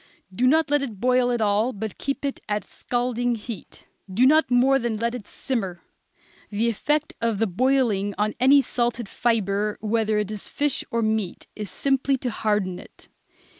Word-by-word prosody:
Do 250 +7 +2
not 315 +2 +3
let 290 -1 +3
it 230 -8 -5
boil 250 +1 +3
at 240 -2 0
all, 215 +4 +2
but 215 0 -6
keep 275 0 -3
it 275 - -2
at 210 0 0
a - - -25
scalding 245 0 -1
heat. 215 -4 -9 0.3
Do 230 +7 +3
not 310 +4 +5
more 260 +2 +4
than 235 -3 -2
let 235 +2 -1
it 240 -5 -7
simmer. 195 -10 -3 0.7
The 220 +3 +1
effect 295 +7 0
of 230 -2 +1
the 225 - +2
boiling 215 -2 +1
on 210 +1 0
any 275 +3 +6
salted 240 -3 -1
fibre, 210 -2 0
whether 215 0 0
it 210 0 -1
is 210 -2 -6
fish 290 -2 -1
or 230 0 0
meat, 215 -4 -1
is 210 -2 -5
simply 270 +5 +1
to 250 -1 -3
harden 205 -5 -1
it. - - -16
230 Hz, 180 wpm, -24 LUFS, 210-255 Hz, 0.7 s, any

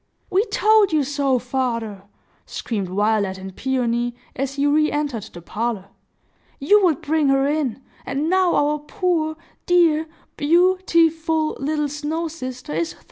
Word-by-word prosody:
"We 390 +4 +3
told 430 -4 +3
you 305 -2 +2
so, 275 -1 +1
father!" 230 -5 -3 0.4
screamed 200 -6 -4
Violet 200 0 0
and 190 0 -9
Peony, 240 -2 -1 0.2
as 275 +1 -3
he 285 0 0
re 305 +1 +3
entered 285 -8 -2
the 175 - -11
parlor. 215 -1 -3 0.7
"You 410 +9 +4
would 315 -6 +1
bring 305 -1 +1
her 270 0 +3
in; 280 -4 -1 0.2
and 280 +4 -2
now 370 0 +3
our 295 +1 +1
poor—dear 325 -1 0 0.3
beau 350 +5 +4
ti 330 -1 +5
ful 320 -1 -1
little 300 +1 -1
snow 300 +3 -3
sister 255 - -7
is 165 +1 -1
thawed!" - - -22
290 Hz, 145 wpm, -21 LUFS, 240-320 Hz, 0.7 s, ti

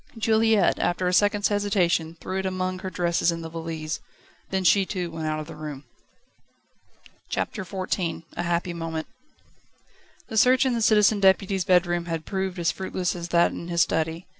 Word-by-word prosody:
Juliette 220 -1 +3
after 180 +1 0
a 180 - 0
second's 205 +1 +3
hesitation 180 -5 +1
threw 190 +2 -3
it 190 - -3
among 185 0 -2
her 190 0 -5
dresses 175 -1 +1
in 165 0 -5
the 165 - -6
valise. 160 -1 -5 0.5
Then 190 -1 -1
she 195 +3 +5
too 180 -3 -4
went 160 -1 -4
out 155 0 -1
of 155 - -5
the - - -10
room. 150 -2 -7 1.5
CHAPTER - - -2
XIV 185 -2 -3
A - - -2
happy 175 0 -1
moment. 165 -1 -4 1.2
The 220 - -4
search 255 +4 +5
in 260 - +1
the 235 - -1
Citizen 210 -1 +4
Deputy's 190 -1 +3
bedroom 175 -2 +2
had 165 -2 -4
proved 190 -1 -3
as 170 -2 +1
fruitless 185 -1 -3
as 170 -1 -5
that 170 0 +3
in 170 - -7
his 170 -1 +3
study. 160 +2 -2
180 Hz, 175 wpm, -25 LUFS, 165-195 Hz, 1.5 s, she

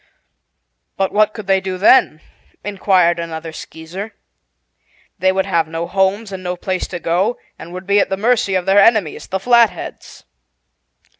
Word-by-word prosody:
"But 195 0 0
what 215 0 +3
could 215 -1 -9
they 190 0 +2
do 190 -1 -4
then?" 185 -5 +4 0.4
inquired 185 -4 +2
another 165 -1 -6
Skeezer. 180 +8 -9 1.0
"They 190 +2 +3
would 190 0 0
have 165 -2 0
no 165 +1 -4
homes 195 +3 0
and 190 -1 -6
no 180 0 -3
place 185 +1 -3
to 175 - -6
go, 185 +9 0 0.2
and 170 - -10
would 185 +1 -8
be 200 +1 +3
at - - +1
the 195 - -2
mercy 215 -2 +1
of 180 -1 0
their 195 +1 +4
enemies, 205 -6 +2
the 190 - -3
Flatheads." 235 +1 0
190 Hz, 160 wpm, -18 LUFS, 175-205 Hz, 1.0 s, then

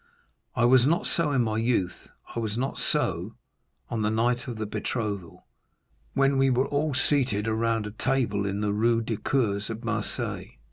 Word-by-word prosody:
I 120 -1 +3
was 125 +1 +6
not 170 +3 +2
so 165 -3 +1
in 130 -3 +3
my 110 -1 -1
youth, 115 -6 0 0.3
I - - -1
was 110 -1 -2
not 135 +3 -2
so - - -1 0.5
on 115 - -2
the 105 - +2
night 120 +3 +1
of 120 -3 -5
the 110 - -2
betrothal, 105 -4 -4 0.7
when 135 0 +3
we 135 0 +4
were 130 +1 +2
all 145 0 0
seated 125 -8 +1
around 115 0 +1
a 105 - -5
table 110 -4 0
in 100 +1 -2
the 105 -1 0
Rue 115 +2 +2
du 110 -1 -2
Cours 105 -3 0
at 115 +1 -5
Marseilles. 115 - -2
115 Hz, 180 wpm, -27 LUFS, 105-130 Hz, 0.7 s, was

